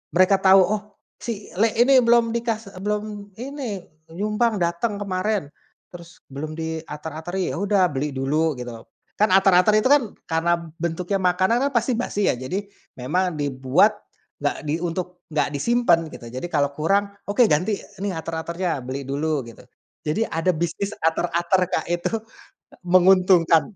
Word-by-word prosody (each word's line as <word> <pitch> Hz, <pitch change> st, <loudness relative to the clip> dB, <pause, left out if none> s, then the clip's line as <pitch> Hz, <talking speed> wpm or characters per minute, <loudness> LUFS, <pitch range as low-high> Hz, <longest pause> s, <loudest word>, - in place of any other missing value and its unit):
mereka 185 Hz, +2 st, +5 dB
tahu, 190 Hz, 0 st, +7 dB
“oh 210 Hz, +2 st, -1 dB, 0.4 s
si 220 Hz, -4 st, -5 dB
le 220 Hz, +4 st, +3 dB
ini 265 Hz, +3 st, +5 dB
belum 235 Hz, -1 st, +4 dB
dikas 225 Hz, -3 st, -3 dB
e -, -, -11 dB
belum 210 Hz, +1 st, -1 dB, 0.4 s
ini 250 Hz, -8 st, -5 dB, 0.3 s
nyumbang 215 Hz, +2 st, +1 dB
datang 175 Hz, +5 st, -1 dB
kemarin, 200 Hz, -1 st, -1 dB, 0.5 s
terus 170 Hz, 0 st, -12 dB
belum 155 Hz, +3 st, -5 dB
diater-ateri” 160 Hz, +2 st, -4 dB
ya -, -, -4 dB
udah 200 Hz, -2 st, +3 dB
beli 145 Hz, +3 st, -1 dB
dulu 145 Hz, +2 st, 0 dB
gitu. 120 Hz, -2 st, -7 dB, 0.3 s
Kan 210 Hz, -1 st, +2 dB
ater-ater 195 Hz, +2 st, +5 dB
itu 255 Hz, -, +1 dB
kan 285 Hz, -2 st, +5 dB, 0.2 s
karena 165 Hz, +1 st, +1 dB, 0.2 s
bentuknya 170 Hz, +3 st, -2 dB
makanan 185 Hz, +6 st, +3 dB
kan -, -, -17 dB
pasti 240 Hz, 0 st, +1 dB
basi 210 Hz, -4 st, -1 dB
ya -, -, +2 dB
jadi, 130 Hz, +11 st, -3 dB, 0.4 s
memang 170 Hz, +5 st, -1 dB
dibuat, 140 Hz, +9 st, +2 dB, 0.4 s
nggak 145 Hz, 0 st, -2 dB
di 150 Hz, -, +1 dB
untuk 180 Hz, +1 st, -4 dB
nggak 150 Hz, -, +1 dB
disimpan 235 Hz, -, +3 dB
gitu 120 Hz, -, -10 dB
jadi 130 Hz, +5 st, -7 dB
kalau 145 Hz, -3 st, +2 dB
kurang, 195 Hz, +7 st, +1 dB, 0.2 s
“oke, 205 Hz, +4 st, -5 dB
ganti 180 Hz, +7 st, +1 dB, 0.2 s
nih 200 Hz, -, -1 dB
ater-aternya 165 Hz, -2 st, -3 dB
beli 130 Hz, +2 st, -4 dB
dulu” 150 Hz, +2 st, -1 dB
gitu. 115 Hz, -, -13 dB, 0.4 s
Jadi 155 Hz, +9 st, 0 dB
ada 165 Hz, +3 st, 0 dB
bisnis 170 Hz, +5 st, -2 dB, 0.2 s
ater-ater 170 Hz, +2 st, +1 dB
Kak -, -, 0 dB
itu, 175 Hz, +3 st, -1 dB, 0.6 s
e -, -, -16 dB
menguntungkan. 180 Hz, -2 st, +5 dB
180 Hz, 150 wpm, -23 LUFS, 160-205 Hz, 0.6 s, tahu